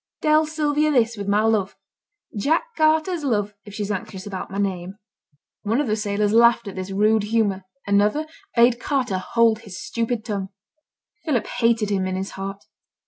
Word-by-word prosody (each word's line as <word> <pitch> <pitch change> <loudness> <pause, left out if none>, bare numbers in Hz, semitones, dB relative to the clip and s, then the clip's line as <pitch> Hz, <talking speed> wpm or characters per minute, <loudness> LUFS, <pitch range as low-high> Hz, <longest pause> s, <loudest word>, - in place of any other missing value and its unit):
Tell 310 0 +4
Sylvia 305 -1 +1
this, 235 -5 +2
with 200 -2 -6
my 205 +1 +3
love; 215 -3 +1 0.6
Jack 285 +11 +1
Carter's 315 +1 +2
love, 210 -6 0
if 205 -1 -10
she's 210 -1 -3
anxious 190 -1 -5
about 195 -2 -5
my 195 - -6
name.' 190 -2 -2 0.7
One 225 +4 0
of 295 - +1
the 215 -3 0
sailors 210 -1 0
laughed 235 -1 +5
at 200 - -5
this 185 0 -5
rude 210 +3 +3
humour; 205 -3 0 0.2
another 205 +9 +2 0.3
bade 235 0 +5
Carter 250 -9 -1
hold 225 +3 +2
his 200 -5 -9
stupid 230 -1 -2
tongue. 200 -4 -3 0.7
Philip 275 -8 0
hated 230 -3 +1
him 190 -2 0
in 185 - -2
his 190 +1 -4
heart. 195 +1 -6
215 Hz, 170 wpm, -23 LUFS, 200-240 Hz, 0.7 s, laughed